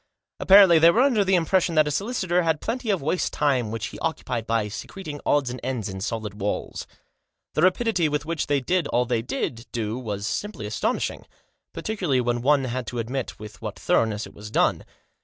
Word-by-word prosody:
Apparently 190 -4 +7
they 165 +1 +7
were 230 +9 +4
under 245 -7 +3
the 190 -1 +3
impression 175 0 +2
that 155 -1 +4
a - - -1
solicitor 185 - 0
had 160 -3 +1
plenty 235 0 -3
of 195 -8 +1
waste 175 +5 0
time 130 -6 +1
which 110 -1 -4
he - - -10
occupied 125 -7 -3
by 115 -2 +1
secreting 145 - -7
odds 140 -4 +2
and 125 - -6
ends 125 -5 -2
in 95 -1 -6
solid 105 -1 -4
walls. 105 - -3 0.7
The - - 0
rapidity 185 -2 +2
with 150 0 -2
which 165 -1 -2
they 145 -1 +1
did 175 +3 0
all 125 +1 +1
they 120 -2 0
did 120 -1 -4
do 115 0 -3
was 105 -5 -4
simply 170 - -3
astonishing, 105 +1 -2 0.4
particularly 180 -12 -1
when 120 -1 0
one 140 +2 +3
had 125 -1 -3
to 125 - -5
admit 125 +3 -3
with 105 0 -11
what - - -5
thoroughness 110 -1 +1
it - - -13
was 105 +1 -10
done. - - +1
135 Hz, 195 wpm, -24 LUFS, 115-175 Hz, 0.7 s, Apparently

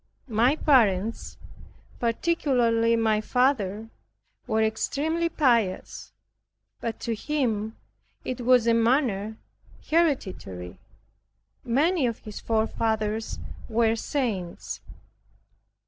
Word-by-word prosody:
My 240 +7 +4
parents, 225 -8 +2 0.6
particularly 235 -3 +2
my 220 -2 +2
father, 225 -4 0 0.6
was 220 -2 +2
extremely 315 +9 0
pious; 235 - 0 0.7
but 230 -1 -4
to 235 - -1
him 225 -4 -1 0.5
it 255 -1 -3
was 245 -1 +4
a 230 - +4
manner 230 -3 +1 0.5
hereditary. 190 - -1 0.8
Many 290 +4 +2
of 230 - -3
his 210 -1 -8
forefathers 220 -1 -1 0.3
were 225 0 +2
saints. 220 -8 -3
230 Hz, 85 wpm, -26 LUFS, 220-260 Hz, 0.8 s, My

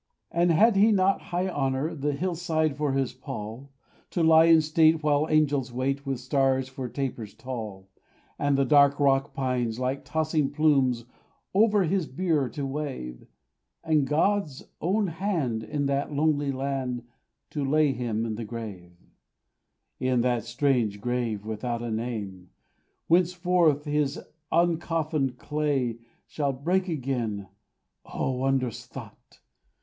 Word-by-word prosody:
And 175 +1 +2
had 205 +6 +5
he 215 +3 +6
not 195 -1 +3
high 180 +2 0
honour, 135 -1 -1
The 145 -1 -1
hillside 160 -2 -1
for 145 -2 -1
his 135 -2 0
pall; 130 -1 -7 0.4
To 170 - 0
lie 160 0 +7
in 165 -1 +7
state, 155 0 +3
while 150 0 +2
angels 145 -5 +2
wait, 135 +3 -2
With 135 -3 -2
stars 130 0 +1
for 130 -1 -6
tapers 120 -6 -4
tall; 110 -7 -7 0.5
And 145 -1 +2
the 140 - +3
dark 140 +1 +5
rock 135 0 +2
pines, 125 -4 -1
like 130 +2 -2
tossing 155 -2 0
plumes, 140 -5 +2 0.5
Over 210 0 +4
his 180 -1 0
bier 150 -3 0
to 140 +5 -4
wave; 135 - -5 0.6
And 155 -4 +2
God's 160 -2 0 0.2
own 200 +6 +1
hand, 165 - -1
in 145 +1 -2
that 140 +1 -1
lonely 145 -1 +1
land, 130 -2 -3 0.5
To 145 - -2
lay 150 +1 +3
him 115 -3 -2
in 110 - -3
the 115 +2 -5
grave; 105 -6 -7 1.1
In 130 -2 +1
that 120 -2 0
strange 120 -4 0
grave, 115 -3 -2
without 115 +2 -3
a 120 - -3
name, 105 -6 -4 0.6
Whence 175 +1 +3 0.5
his 145 -1 0 0.3
uncoffined 160 -5 0
clay 140 -7 -1 0.3
Shall 140 -2 -2
break 180 +8 0
again 120 - -3 0.5
O - - -2
wondrous 130 -2 -1
thought! - - -12
140 Hz, 135 wpm, -27 LUFS, 125-155 Hz, 1.1 s, lie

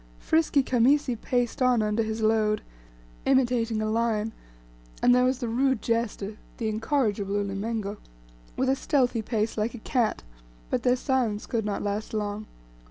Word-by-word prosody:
Frisky 315 -3 +2
Khamisi 260 +2 +3
paced 245 +2 -1
on 250 -3 +4
under 210 +1 +1
his 220 0 -2
load, 215 -1 +2 0.6
imitating 240 -4 +2
a - - 0
lion 225 -1 0 0.7
and 245 - +5
there 250 0 +4
was 255 0 +2
the 245 -2 -3
rude 260 +2 +1
jester 220 -2 -2 0.2
the 225 - -2
incorrigible 215 -3 0
Ulimengo 205 +1 -2 0.6
with 260 - +1
a 265 - +3
stealthy 255 -4 +1
pace 220 0 -1
like 220 +3 -1
a 225 - -12
cat. 240 -5 0 0.5
But - - +1
their 250 0 +3
silence 250 -5 0
could 225 -3 -2
not 205 -1 -2
last 210 +2 -3
long. 210 0 -3
230 Hz, 155 wpm, -27 LUFS, 215-250 Hz, 0.7 s, and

